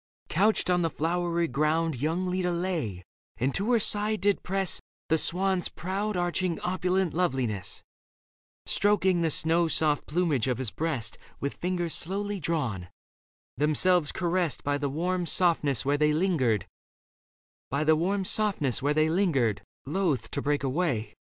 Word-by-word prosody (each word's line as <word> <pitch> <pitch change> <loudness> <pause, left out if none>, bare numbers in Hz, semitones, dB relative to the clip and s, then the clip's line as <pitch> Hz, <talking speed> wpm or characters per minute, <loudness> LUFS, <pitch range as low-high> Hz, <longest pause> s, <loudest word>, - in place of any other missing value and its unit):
Couched 200 +1 +2
on 180 0 +2
the 165 - +1
flowery 170 +2 -1
ground 155 +4 0
Young 160 +8 -1
Leda 180 -1 0
lay, 170 - -2 0.3
and 130 +3 0
to 205 +5 0
her 235 - +4
side 210 0 0
did 200 0 +2
press 195 -1 0 0.3
The 160 - +4
swan's 185 +1 +1
proud 195 +3 -3
arching 175 0 -1
opulent 185 0 0
loveliness, 130 - -1 0.8
Stroking 190 -3 +2
the 165 - +2
snow 165 +3 +2
soft 155 -2 +1
plumage 155 -7 0
of 125 - 0
his 125 -4 -2
breast 135 -9 -2 0.2
With 140 - -2
fingers 175 -2 -2
slowly 200 +3 -2
drawn, 125 - -2 0.7
themselves 155 +3 +3
caressed 175 -3 0
By 145 0 0
the 145 -1 -1
warm 175 +4 -1
softness 155 -8 +2
where 145 +1 +1
they 150 0 +3
lingered, 150 - +1 1.1
loth 155 - 0
To 140 - -2
break 145 0 0
away. 135 -5 -1
165 Hz, 125 wpm, -27 LUFS, 145-185 Hz, 1.1 s, her